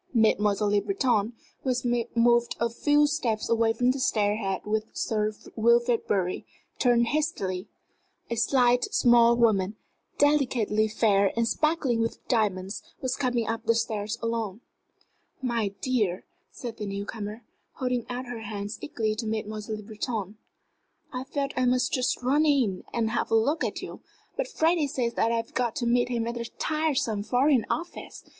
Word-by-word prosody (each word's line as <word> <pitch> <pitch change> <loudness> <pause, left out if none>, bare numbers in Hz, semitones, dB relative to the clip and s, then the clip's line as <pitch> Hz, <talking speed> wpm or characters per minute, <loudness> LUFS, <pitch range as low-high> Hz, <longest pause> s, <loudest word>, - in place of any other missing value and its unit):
Mademoiselle 210 -2 +3
Le 205 - +4
Breton, 245 - +1 0.3
who 265 - -2
had 245 -2 0
moved 235 0 +3
a 235 0 0
few 290 +5 +3
steps 250 -8 -1
away 230 -1 +3
from 245 +2 +2
the 270 - -3
stair 210 -4 +1
head 195 -4 -2
with 215 +1 0
Sir 215 -1 0 0.2
Wilfrid 235 +1 +3
Bury, 185 -3 0 0.4
turned 235 -2 +3
hastily. 210 - -1 0.6
A 235 - -2
slight, 245 +1 +3
small 240 - +5
woman, 210 -4 +2 0.4
delicately 245 -7 +2
fair 200 -2 +3
and 230 0 +2
sparkling 295 -5 +1
with 230 - -3
diamonds, 200 -5 0 0.2
was 260 0 -1
coming 245 -4 0
up 225 +1 -3
the 230 - +4
stairs 215 -1 -2
alone. 230 -2 -2 0.8
"My 235 -5 0
dear," 215 -8 0 0.2
said 235 -3 -7
the 210 - -4
new 200 0 -4
comer, 215 +1 -6 0.3
holding 250 -2 -2
out 250 +1 -4
her 245 -2 -6
hands 205 -1 -5
eagerly 220 -6 -1
to 220 +1 -4
Mademoiselle 215 0 -3
Le 210 - -9
Breton, 215 -1 -4 0.8
"I 255 +1 -4
felt 280 0 -2
I 255 - +1
must 250 +1 +1
just 250 -1 0
run 280 +5 +3
in 260 -11 +2
and 225 -2 0
have 240 - -1
a - - +3
look 280 +9 +2
at - - -3
you. - - -7 0.4
But - - -2
Freddie 330 -8 +2
says 245 -3 -1
that 230 - +1
I've 230 -1 -2
got 240 -3 0
to 240 - -2
meet 240 +1 +2
him 235 -2 -1
at 235 - -2
that 235 -1 -7
tiresome 300 -9 0
Foreign 250 +2 +2
Office! 340 +2 -5
235 Hz, 165 wpm, -27 LUFS, 215-255 Hz, 0.8 s, small